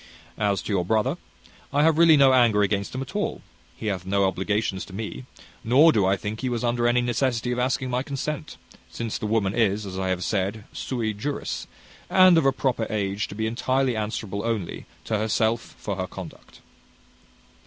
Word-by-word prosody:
As 100 Hz, -2 st, +1 dB
to 105 Hz, -, -3 dB
your 90 Hz, -3 st, +1 dB
brother, 110 Hz, -, +1 dB, 0.6 s
I 145 Hz, +1 st, +3 dB
have 160 Hz, 0 st, +3 dB
really 165 Hz, -2 st, +7 dB
no 135 Hz, -2 st, +6 dB
anger 115 Hz, -5 st, +4 dB
against 100 Hz, +2 st, -1 dB
him 130 Hz, -, -2 dB
at 135 Hz, -, -12 dB
all. -, -, -2 dB, 0.3 s
He -, -, -7 dB
hath 95 Hz, -4 st, -2 dB
no 100 Hz, +1 st, +1 dB
obligations 95 Hz, +1 st, -1 dB
to 95 Hz, -, -13 dB
me, 110 Hz, +4 st, -6 dB, 0.4 s
nor 140 Hz, +8 st, +6 dB
do 100 Hz, -9 st, +2 dB
I 95 Hz, +1 st, +2 dB
think 105 Hz, +3 st, -5 dB
he 130 Hz, -, -1 dB
was 120 Hz, -1 st, -2 dB
under 120 Hz, 0 st, +1 dB
any 120 Hz, +1 st, +3 dB
necessity 120 Hz, 0 st, 0 dB
of 125 Hz, -, -1 dB
asking 130 Hz, 0 st, 0 dB
my 125 Hz, +1 st, 0 dB
consent, 150 Hz, +3 st, -4 dB, 0.3 s
since 115 Hz, -2 st, -4 dB
the 110 Hz, -, -3 dB
woman 105 Hz, -3 st, +1 dB
is, 105 Hz, -2 st, +1 dB
as 95 Hz, -1 st, -5 dB
I 95 Hz, -, -1 dB
have 90 Hz, -1 st, -1 dB
said, 100 Hz, +1 st, -1 dB
sui 115 Hz, -4 st, -2 dB
juris, 140 Hz, +8 st, -4 dB, 0.4 s
and 185 Hz, -1 st, +7 dB
of 135 Hz, -, +2 dB
a -, -, +5 dB
proper 130 Hz, -4 st, -1 dB
age 100 Hz, -1 st, -1 dB
to -, -, -9 dB
be 110 Hz, +1 st, -2 dB
entirely 130 Hz, +2 st, 0 dB
answerable 105 Hz, -2 st, -3 dB
only, 115 Hz, -6 st, -3 dB, 0.2 s
to 110 Hz, -2 st, 0 dB
herself 110 Hz, +2 st, 0 dB
for 100 Hz, -, -4 dB
her 95 Hz, -1 st, -2 dB
conduct." -, -, -11 dB
110 Hz, 195 wpm, -25 LUFS, 100-130 Hz, 0.6 s, really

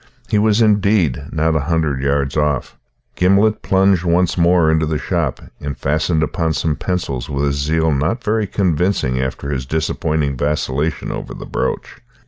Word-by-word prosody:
He 105 Hz, -, +2 dB
was, 110 Hz, +1 st, +3 dB
indeed, 100 Hz, -, +2 dB
not 80 Hz, 0 st, +1 dB
a -, -, +2 dB
hundred 80 Hz, -5 st, 0 dB
yards 70 Hz, 0 st, 0 dB
off. 75 Hz, -3 st, 0 dB, 0.4 s
Gimblet 100 Hz, +4 st, +3 dB
plunged 95 Hz, -2 st, +2 dB
once 90 Hz, 0 st, +2 dB
more 85 Hz, -2 st, +4 dB
into 80 Hz, 0 st, +1 dB
the 75 Hz, 0 st, -1 dB
shop, -, -, -2 dB, 0.2 s
and 70 Hz, -1 st, -5 dB
fastened 80 Hz, +2 st, 0 dB
upon 80 Hz, 0 st, -1 dB
some 75 Hz, +2 st, 0 dB
pencils 70 Hz, -10 st, -3 dB
with 70 Hz, +1 st, -1 dB
a 70 Hz, -, +1 dB
zeal 80 Hz, +3 st, +1 dB
not 80 Hz, -, -1 dB
very 110 Hz, -1 st, 0 dB
convincing 90 Hz, -9 st, 0 dB
after 65 Hz, +2 st, -4 dB
his 65 Hz, -2 st, -3 dB
disappointing 75 Hz, -1 st, -1 dB
vacillation 75 Hz, +2 st, -1 dB
over -, -, -6 dB
the -, -, -8 dB
brooch. -, -, -3 dB
80 Hz, 160 wpm, -18 LUFS, 70-90 Hz, 0.4 s, more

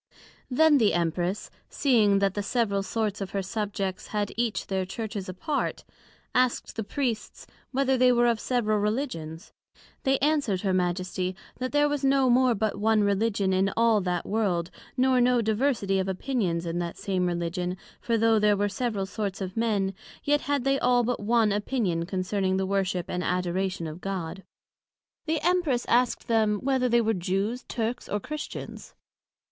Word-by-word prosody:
Then 295 Hz, +2 st, +5 dB
the 215 Hz, -6 st, +3 dB
Empress 175 Hz, +3 st, -1 dB, 0.2 s
seeing 220 Hz, -8 st, +3 dB
that 195 Hz, -1 st, +2 dB
the 205 Hz, -, -2 dB
several 205 Hz, -2 st, 0 dB
sorts 210 Hz, 0 st, -2 dB
of 195 Hz, -, -3 dB
her 195 Hz, -, -1 dB
Subjects 195 Hz, -1 st, -3 dB
had 205 Hz, -1 st, -2 dB
each 235 Hz, -2 st, -1 dB
their 190 Hz, -1 st, -1 dB
Churches 200 Hz, 0 st, -5 dB
apart, 285 Hz, -, -2 dB, 0.5 s
asked 255 Hz, -1 st, +1 dB
the 225 Hz, -, -2 dB
Priests, 240 Hz, -1 st, -3 dB, 0.3 s
whether 265 Hz, 0 st, +2 dB
they 250 Hz, 0 st, +5 dB
were 240 Hz, 0 st, +3 dB
of 235 Hz, -2 st, +2 dB
several 215 Hz, -4 st, 0 dB
Religions? 205 Hz, -, -3 dB, 0.5 s
They 270 Hz, 0 st, +2 dB
answered 280 Hz, -10 st, +1 dB
her 195 Hz, -2 st, 0 dB
Majesty, 185 Hz, +1 st, -1 dB, 0.2 s
That 255 Hz, 0 st, -2 dB
there 290 Hz, 0 st, +3 dB
was 290 Hz, -1 st, -2 dB
no 270 Hz, -2 st, +4 dB
more 250 Hz, -1 st, +4 dB
but 210 Hz, -1 st, -1 dB
one 215 Hz, 0 st, +3 dB
Religion 200 Hz, -1 st, +1 dB
in 190 Hz, +1 st, +2 dB
all 230 Hz, -2 st, +4 dB
that 180 Hz, -2 st, -2 dB
World, 190 Hz, -5 st, 0 dB, 0.3 s
nor 255 Hz, 0 st, +4 dB
no 245 Hz, 0 st, +4 dB
diversity 220 Hz, -3 st, +1 dB
of 190 Hz, -, -1 dB
opinions 190 Hz, -4 st, -1 dB
in 170 Hz, +1 st, -2 dB
that 170 Hz, -1 st, -4 dB
same 185 Hz, -2 st, -1 dB
Religion 175 Hz, +1 st, -2 dB, 0.2 s
for 230 Hz, -1 st, +1 dB
though 225 Hz, 0 st, +4 dB
there 210 Hz, -1 st, +3 dB
were 205 Hz, +1 st, +1 dB
several 205 Hz, -1 st, -2 dB
sorts 195 Hz, -1 st, -4 dB
of 190 Hz, -1 st, -5 dB
men, 210 Hz, -4 st, 0 dB, 0.3 s
yet 290 Hz, 0 st, +2 dB
had 285 Hz, -2 st, -1 dB
they 275 Hz, +1 st, +2 dB
all 245 Hz, -1 st, +3 dB
but 245 Hz, +1 st, -1 dB
one 220 Hz, 0 st, +2 dB
opinion 200 Hz, -5 st, -1 dB
concerning 190 Hz, 0 st, 0 dB
the 190 Hz, -, 0 dB
Worship 190 Hz, -2 st, 0 dB
and 180 Hz, 0 st, -3 dB
Adoration 180 Hz, 0 st, -1 dB
of 160 Hz, +2 st, -7 dB
God. 190 Hz, -2 st, -4 dB, 0.9 s
The 315 Hz, 0 st, +1 dB
Empress 345 Hz, -8 st, +1 dB
asked 245 Hz, 0 st, +2 dB
them, 220 Hz, -2 st, +2 dB
Whether 260 Hz, +1 st, +1 dB
they 235 Hz, 0 st, +4 dB
were 225 Hz, 0 st, +1 dB
Jews, 195 Hz, +6 st, -2 dB
Turks, 235 Hz, +1 st, -3 dB
or 205 Hz, -, -1 dB
Christians? 305 Hz, +8 st, -7 dB
210 Hz, 170 wpm, -27 LUFS, 190-245 Hz, 0.9 s, Then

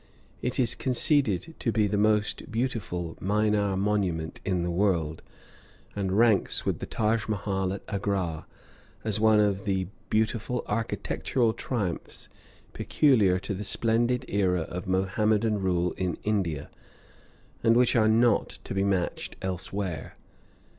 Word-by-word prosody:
It 125 Hz, +1 st, -2 dB
is 120 Hz, -3 st, +3 dB
conceded 130 Hz, -, +1 dB
to 115 Hz, -, 0 dB
be 110 Hz, -2 st, +2 dB
the 105 Hz, 0 st, 0 dB
most 105 Hz, +1 st, +1 dB
beautiful 110 Hz, -8 st, -2 dB
minar 105 Hz, 0 st, +1 dB
monument 95 Hz, -6 st, -1 dB
in 90 Hz, -3 st, 0 dB
the 85 Hz, -, -1 dB
world, 85 Hz, -4 st, 0 dB, 0.7 s
and 95 Hz, -1 st, -1 dB
ranks 115 Hz, -3 st, +3 dB
with -, -, -1 dB
the -, -, -5 dB
Taj 110 Hz, 0 st, 0 dB
Mahal 95 Hz, -2 st, -1 dB
at 100 Hz, -, -5 dB
Agra 95 Hz, -6 st, -2 dB, 0.6 s
as 110 Hz, -1 st, -1 dB
one 110 Hz, -1 st, +5 dB
of 100 Hz, -1 st, +1 dB
the 95 Hz, -2 st, -1 dB, 0.2 s
beautiful 110 Hz, +2 st, 0 dB
architectural 115 Hz, +2 st, -1 dB
triumphs 105 Hz, -10 st, -4 dB, 0.4 s
peculiar 110 Hz, -11 st, +3 dB
to 105 Hz, -, -3 dB
the 100 Hz, +2 st, -4 dB
splendid 120 Hz, +4 st, +1 dB
era 95 Hz, -3 st, +1 dB
of 90 Hz, +3 st, -6 dB
Mohammedan 105 Hz, +3 st, +1 dB
rule 90 Hz, -2 st, +1 dB
in 90 Hz, -3 st, -3 dB
India, 90 Hz, -9 st, -1 dB, 0.9 s
and 115 Hz, 0 st, +5 dB
which 125 Hz, +1 st, +4 dB
are 110 Hz, -2 st, +4 dB
not 115 Hz, 0 st, +3 dB
to -, -, -6 dB
be 95 Hz, 0 st, +1 dB
matched 95 Hz, -3 st, -1 dB
elsewhere. 95 Hz, -3 st, -4 dB
105 Hz, 135 wpm, -27 LUFS, 95-110 Hz, 0.9 s, one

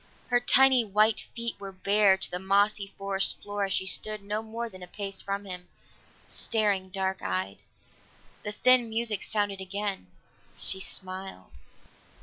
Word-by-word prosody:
Her 245 Hz, -1 st, +4 dB
tiny 260 Hz, 0 st, +6 dB
white 215 Hz, +1 st, +2 dB, 0.2 s
feet 235 Hz, -2 st, -3 dB
were 195 Hz, -1 st, -7 dB
bare 200 Hz, +1 st, +4 dB
to 190 Hz, -, -5 dB
the 180 Hz, -, -2 dB
mossy 200 Hz, +2 st, +1 dB
forest 195 Hz, 0 st, -1 dB
floor 205 Hz, -1 st, -3 dB
as 195 Hz, -, -2 dB
she 190 Hz, -, 0 dB
stood 215 Hz, +2 st, 0 dB
no 210 Hz, +2 st, -2 dB
more 225 Hz, +1 st, -5 dB
than 185 Hz, -5 st, -13 dB
a 180 Hz, -, -9 dB
pace 195 Hz, 0 st, -5 dB
from 200 Hz, 0 st, -4 dB
him, 180 Hz, -2 st, -8 dB, 0.6 s
staring 205 Hz, -4 st, 0 dB
dark 190 Hz, 0 st, -2 dB
eyed. 95 Hz, +2 st, -3 dB, 0.8 s
The 210 Hz, -, -4 dB
thin 245 Hz, +2 st, +4 dB
music 220 Hz, -2 st, 0 dB
sounded 205 Hz, -2 st, -2 dB
again; 195 Hz, -, -4 dB, 0.5 s
she 190 Hz, -, +4 dB
smiled. 190 Hz, 0 st, -4 dB
200 Hz, 150 wpm, -28 LUFS, 190-215 Hz, 0.8 s, tiny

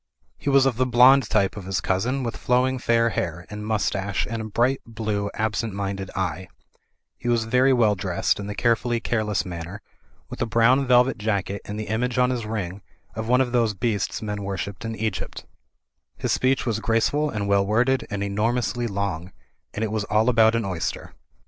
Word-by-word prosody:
He -, -, -2 dB
was 135 Hz, -1 st, +5 dB
of 130 Hz, -4 st, +1 dB
the 130 Hz, 0 st, +2 dB
blond 125 Hz, +2 st, +6 dB
type 100 Hz, -3 st, +2 dB
of 100 Hz, -3 st, -7 dB
his 95 Hz, -1 st, -1 dB
cousin, 120 Hz, +10 st, -1 dB
with 115 Hz, -1 st, -3 dB
flowing 130 Hz, +1 st, +1 dB
fair 115 Hz, -1 st, +2 dB
hair 85 Hz, -2 st, -3 dB
and 105 Hz, 0 st, -6 dB
mustache, 100 Hz, -2 st, -1 dB
and 115 Hz, 0 st, -4 dB
a -, -, -5 dB
bright 120 Hz, +5 st, +1 dB
blue, 110 Hz, -3 st, -3 dB
absent 110 Hz, -1 st, -1 dB
minded 95 Hz, -1 st, -3 dB
eye; 90 Hz, -1 st, -2 dB, 0.7 s
he -, -, -6 dB
was 120 Hz, -2 st, +2 dB
very 125 Hz, +4 st, +3 dB
well 115 Hz, -5 st, +4 dB
dressed 95 Hz, -1 st, -1 dB
in 100 Hz, -, -5 dB
the 105 Hz, -, -5 dB
carefully 120 Hz, 0 st, +1 dB
careless 110 Hz, -3 st, -1 dB
manner, 85 Hz, +2 st, -6 dB, 0.5 s
with -, -, -8 dB
a -, -, +1 dB
brown 115 Hz, +5 st, +3 dB
velvet 125 Hz, 0 st, +4 dB
jacket 100 Hz, -2 st, -2 dB
and 105 Hz, +1 st, -5 dB
the -, -, -2 dB
image 120 Hz, +3 st, -1 dB
on 125 Hz, 0 st, +3 dB
his 120 Hz, -4 st, -3 dB
ring 100 Hz, -3 st, -4 dB, 0.3 s
of 110 Hz, 0 st, -5 dB
one 125 Hz, +2 st, +4 dB
of 125 Hz, -2 st, 0 dB
those 115 Hz, -4 st, +1 dB
beasts 110 Hz, 0 st, -2 dB
men 105 Hz, -1 st, -3 dB
wor 100 Hz, -1 st, -3 dB
shipped 100 Hz, +2 st, -5 dB
in 115 Hz, 0 st, -3 dB
Egypt 110 Hz, -3 st, -4 dB, 0.7 s
His -, -, -2 dB
speech 130 Hz, +1 st, +1 dB
was 110 Hz, -3 st, 0 dB
graceful 120 Hz, +7 st, +1 dB
and 105 Hz, -5 st, -3 dB
well 100 Hz, 0 st, +3 dB
worded 125 Hz, +6 st, +1 dB
and 100 Hz, -1 st, -3 dB
enor 105 Hz, +4 st, 0 dB
mously 120 Hz, +1 st, -2 dB
long, 95 Hz, -3 st, -3 dB, 0.4 s
and 110 Hz, -, -3 dB
it 110 Hz, -, -2 dB
was 110 Hz, -1 st, -1 dB
all 110 Hz, +3 st, +2 dB
about 115 Hz, -2 st, +4 dB
an 115 Hz, -2 st, 0 dB
oyster. 90 Hz, -4 st, -4 dB
110 Hz, 200 wpm, -24 LUFS, 100-120 Hz, 0.7 s, blond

